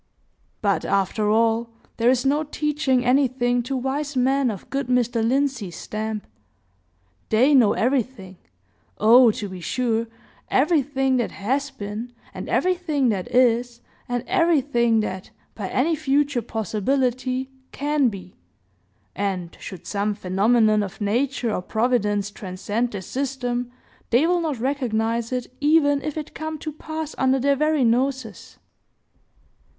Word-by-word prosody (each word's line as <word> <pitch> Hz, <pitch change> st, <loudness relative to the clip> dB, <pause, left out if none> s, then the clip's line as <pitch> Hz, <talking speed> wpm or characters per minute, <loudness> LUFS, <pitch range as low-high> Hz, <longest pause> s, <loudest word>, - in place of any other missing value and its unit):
But, 200 Hz, -6 st, +1 dB
after 200 Hz, +2 st, 0 dB
all, 225 Hz, +1 st, +2 dB, 0.3 s
there 235 Hz, +1 st, +3 dB
is 255 Hz, +1 st, +2 dB
no 290 Hz, +3 st, +2 dB
teaching 295 Hz, -4 st, 0 dB
anything 245 Hz, -1 st, +2 dB
to 260 Hz, +3 st, -3 dB
wise 275 Hz, +3 st, -2 dB
men 265 Hz, +1 st, +2 dB
of 200 Hz, -5 st, -6 dB
good 275 Hz, -2 st, -2 dB
Mr. 240 Hz, -2 st, +1 dB
Lindsey's 250 Hz, -6 st, 0 dB
stamp. 215 Hz, 0 st, -4 dB, 1.0 s
They 250 Hz, +7 st, +4 dB
know 245 Hz, -7 st, +5 dB
everything,—oh, 215 Hz, -, +1 dB
to 215 Hz, -1 st, -3 dB
be 185 Hz, -2 st, -8 dB
sure!—everything 260 Hz, -, 0 dB
that 240 Hz, -, -1 dB
has 270 Hz, +7 st, -1 dB
been, 225 Hz, -1 st, -7 dB, 0.2 s
and -, -, -7 dB
everything 345 Hz, -8 st, +1 dB
that 195 Hz, -4 st, -2 dB
is, 240 Hz, -1 st, +2 dB, 0.3 s
and 245 Hz, -1 st, -1 dB
everything 280 Hz, -, +2 dB
that, 190 Hz, -3 st, -5 dB, 0.2 s
by 205 Hz, -3 st, -5 dB
any 315 Hz, +6 st, +1 dB
future 285 Hz, -3 st, +1 dB
possibility, 255 Hz, +4 st, -1 dB, 0.2 s
can 290 Hz, -1 st, +1 dB
be. 185 Hz, -4 st, -10 dB, 0.8 s
And, 185 Hz, -3 st, -3 dB
should 185 Hz, -4 st, -9 dB
some 205 Hz, 0 st, -1 dB
phenomenon 215 Hz, +3 st, +2 dB
of 195 Hz, -1 st, -6 dB
nature 235 Hz, +2 st, 0 dB
or -, -, -1 dB
providence 210 Hz, -2 st, 0 dB
transcend 205 Hz, +5 st, -3 dB
their 200 Hz, -, -4 dB
system, 245 Hz, +1 st, -3 dB, 0.4 s
they 245 Hz, +7 st, +4 dB
will 350 Hz, +1 st, +2 dB
not 310 Hz, -5 st, -2 dB
recognize 235 Hz, -3 st, -1 dB
it, 250 Hz, 0 st, -4 dB
even 290 Hz, -1 st, +4 dB
if 305 Hz, +1 st, -4 dB
it 305 Hz, -1 st, -6 dB
come 315 Hz, 0 st, -5 dB
to 310 Hz, +1 st, -5 dB
pass 315 Hz, 0 st, -6 dB
under 265 Hz, 0 st, +3 dB
their 280 Hz, +2 st, +2 dB
very 305 Hz, 0 st, +2 dB
noses. 245 Hz, -1 st, -1 dB
245 Hz, 130 wpm, -23 LUFS, 215-275 Hz, 1.0 s, know